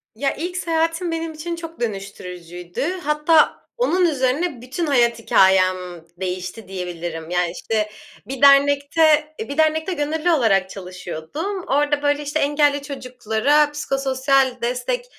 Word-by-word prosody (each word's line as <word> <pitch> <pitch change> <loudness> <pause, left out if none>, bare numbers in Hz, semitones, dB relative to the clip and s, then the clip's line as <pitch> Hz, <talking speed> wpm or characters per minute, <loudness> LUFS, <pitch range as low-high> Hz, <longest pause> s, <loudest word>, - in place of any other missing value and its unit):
Ya, 275 +4 -1
ilk 355 +3 -4
seyahatim 330 +1 -1
benim 330 0 -3
için 335 +2 -5
çok 330 -1 -9
dönüştürücüydü. 180 -5 -6 0.2
Hatta 300 +2 +3
onun 370 -7 +2
üzerine 280 -1 0
bütün 265 +7 -3
hayat 240 -5 +2
hikâyem 190 -3 +4 0.4
değişti, 185 +3 -5
diyebilirim. 175 -3 -6
Yani, 175 -1 0
işte 215 +4 -2 0.4
bir 265 -1 -6
dernekte, 285 +2 +4
eee, 445 - -5
bir 280 - -5
dernekte 315 +3 +2
gönüllü 315 +3 0
olarak 200 - +2
çalışıyordum. 185 - -6
Orda, 290 +1 +1
böyle, 290 0 +1
işte, 295 +2 -2
engelli 290 -1 +2
çocuklara 265 +1 0
psikososyal 270 -2 +1
destek 255 - -2
280 Hz, 125 wpm, -21 LUFS, 200-315 Hz, 0.4 s, hikâyem